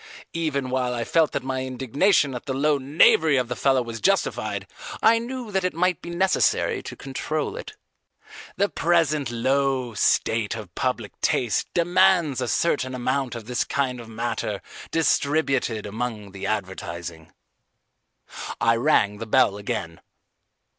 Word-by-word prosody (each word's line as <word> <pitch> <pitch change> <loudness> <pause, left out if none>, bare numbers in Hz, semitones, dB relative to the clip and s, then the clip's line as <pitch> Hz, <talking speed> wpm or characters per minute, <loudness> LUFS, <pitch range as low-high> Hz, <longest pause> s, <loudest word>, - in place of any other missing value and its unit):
Even 145 -6 -2
while 125 -1 0
I 120 - -2
felt 160 +6 +2
that 135 - -2
my 130 0 -2
indignation 135 - +1
at 125 - -7
the 130 - -2
low 145 +1 +2
knavery 145 +2 +4
of 125 -1 0
the 125 - -2
fellow 135 -1 +2
was 115 -1 -7
justified, 195 0 0 0.4
I 230 +1 +6
knew 240 -1 -6
that 190 -1 0
it 185 -3 -1
might 180 0 +1
be 170 - -8
necessary 180 +2 +1
to - - -8
control 140 +3 -3
it. - - -8 0.8
The 200 +2 +2
present 160 - +1
low 130 +1 0
state 110 +1 +1
of 105 -6 -9
public 120 -3 -3
taste 120 -6 +1
demands 175 -5 +3
a 125 - -1
certain 130 -1 0
amount 130 0 -1
of 115 -2 -7
this 125 +1 0
kind 130 -3 -1
of 115 - -12
matter 110 -2 -3 0.3
distributed 140 -8 +1
among 105 -1 -4
the 100 0 -5
advertising. 85 -5 -5 1.3
I 115 0 +3
rang 110 -6 +2
the 115 - -6
bell 100 - +4
again. 85 -5 -4
130 Hz, 145 wpm, -24 LUFS, 115-155 Hz, 1.3 s, I